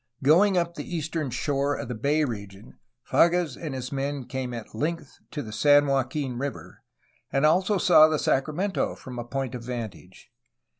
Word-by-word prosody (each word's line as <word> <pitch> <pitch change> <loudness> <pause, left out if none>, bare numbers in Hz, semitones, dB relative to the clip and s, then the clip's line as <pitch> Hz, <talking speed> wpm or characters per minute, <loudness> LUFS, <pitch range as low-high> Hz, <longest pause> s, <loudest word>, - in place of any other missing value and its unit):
Going 180 +7 +5
up 170 -1 0
the 175 - -6
eastern 160 -2 -2
shore 140 +3 -1
of - - -5
the 125 - -4
bay 145 +7 +1
region 100 -5 -8 0.3
Fages 170 -5 +3
and 155 -5 -6
his 130 0 -5
men 140 -1 -3
came 130 -1 -4
at 115 -3 -8
length 155 +4 -4
to 150 - -5
the 110 - -8
San 145 +6 +5
Joaquin 135 -1 -1
River, 140 +1 -6 0.5
and 135 +2 +2
also 185 +6 +3
saw 165 -4 +7
the 155 -1 0
Sacramento 155 +9 0
from 125 -2 -8
a - - -3
point 135 +1 -4
of 125 -2 -6
vantage. 115 -5 -7
140 Hz, 170 wpm, -26 LUFS, 125-155 Hz, 0.5 s, saw